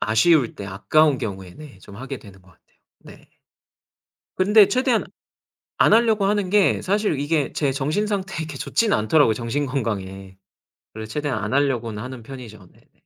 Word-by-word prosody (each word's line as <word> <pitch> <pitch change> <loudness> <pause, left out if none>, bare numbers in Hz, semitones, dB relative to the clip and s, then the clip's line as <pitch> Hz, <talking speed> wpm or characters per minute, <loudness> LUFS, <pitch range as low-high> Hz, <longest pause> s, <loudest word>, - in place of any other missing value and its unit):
아쉬울 120 +4 +3
때 100 - -8
아까운 135 +9 +2
경우에 95 -3 -6
네 145 -10 -13
좀 100 +1 -14
하게 135 +3 -7
되는 95 -3 -16
것 90 - -24
같아요. 85 - -31 0.2
네. - - -16 1.1
근데 205 +2 +6
최대한 255 -2 +1 0.7
안 - - +4
하려고 220 -3 +3
하는 200 -2 0
게 205 -1 +3
사실 200 -6 0
이게 145 -1 -1
제 145 -3 0
정신상태에 195 +7 -2
이렇게 160 -3 -5
좋지는 220 - 0
않더라고요 110 +2 +3
정신 120 +6 -2
건강에. 95 -7 -4 0.6
그래서 110 0 -8
최대한 145 -6 -2
안 105 - -3
하려고는 120 -7 0
하는 130 -1 -8
편이죠. 110 -7 -11
네네. - - -27
135 Hz, 355 characters per minute, -22 LUFS, 110-185 Hz, 1.1 s, 근데